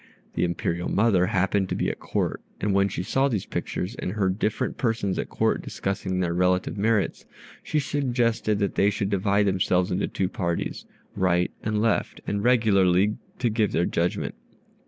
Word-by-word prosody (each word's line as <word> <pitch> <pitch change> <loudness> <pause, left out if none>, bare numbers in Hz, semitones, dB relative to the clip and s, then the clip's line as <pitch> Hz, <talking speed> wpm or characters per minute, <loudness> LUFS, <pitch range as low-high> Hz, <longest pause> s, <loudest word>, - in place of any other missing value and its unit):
The - - 0
Imperial 85 0 -1
mother 100 -4 +3
happened 95 +1 +1
to - - -1
be - - 0
at - - -10
Court, - - -2 0.2
and 105 0 0
when 100 0 +3
she 90 - -3
saw 135 +7 +2
these 110 -8 -2
pictures 90 +5 -3
and 90 - -3
heard 95 -2 0
different 110 0 -1
persons 110 -6 0
at - - -3
Court - - +1
discussing 95 -1 -2
their 85 -2 0
relative 90 +1 +1
merits, 105 0 0 0.3
she - - -2
suggested 120 -6 0
that 100 -1 0
they 100 - +3
should 100 0 -2
divide 100 +1 +2
themselves 95 -1 +1
into 90 +3 0
two 95 - -1
parties, 85 -2 -3 0.3
right 90 -1 +2
and 105 0 0
left, 115 -2 0
and 100 0 -2
regularly 105 -4 +3 0.2
to 125 -2 +1
give 110 -2 +1
their 85 - +2
judgment. 85 +1 -1
100 Hz, 175 wpm, -25 LUFS, 90-110 Hz, 0.3 s, mother